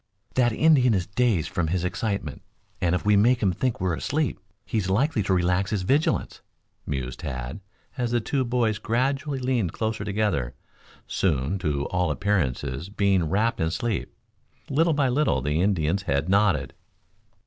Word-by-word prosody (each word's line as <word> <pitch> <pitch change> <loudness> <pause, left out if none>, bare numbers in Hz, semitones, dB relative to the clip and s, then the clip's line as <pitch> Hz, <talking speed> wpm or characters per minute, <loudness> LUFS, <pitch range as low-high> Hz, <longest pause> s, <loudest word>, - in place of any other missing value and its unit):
"That 120 -2 +3
Indian 130 -3 +4
is 90 -2 0
dazed 100 -4 +1
from 90 -4 -1
his 90 +2 -1
excitement, 100 - -3 0.4
and 90 0 +2
if 90 - -3
we 105 0 +5
make 120 +4 +3
him 95 - +3
think 125 +6 -1
we're 90 -2 0
asleep 145 - -1 0.3
he's 105 -5 -1
likely 120 +5 +2
to 95 - -2
relax 90 +1 +2
his 100 -4 -1
vigilance," 150 - 0 0.5
mused 65 -2 -4
Tad, 65 0 -5 0.4
as 120 -1 0
the 120 0 +1
two 130 +4 -1
boys 120 -3 0
gradually 135 +5 -1
leaned 125 -9 0
closer 110 -2 -2
together, 100 - -1 0.5
soon 80 +1 0
to 70 -4 -1
all 90 -2 0
appearances 75 -4 -1
being 100 -5 +1
wrapped 110 +5 +1
in 80 - +1
sleep. 105 +6 -2 0.6
Little 160 +4 +3
by 145 -2 +2
little 140 +4 +2
the 75 +3 0
Indian's 95 -1 +1
head 70 -4 -1
nodded. 95 -9 +2
100 Hz, 160 wpm, -25 LUFS, 85-120 Hz, 0.6 s, we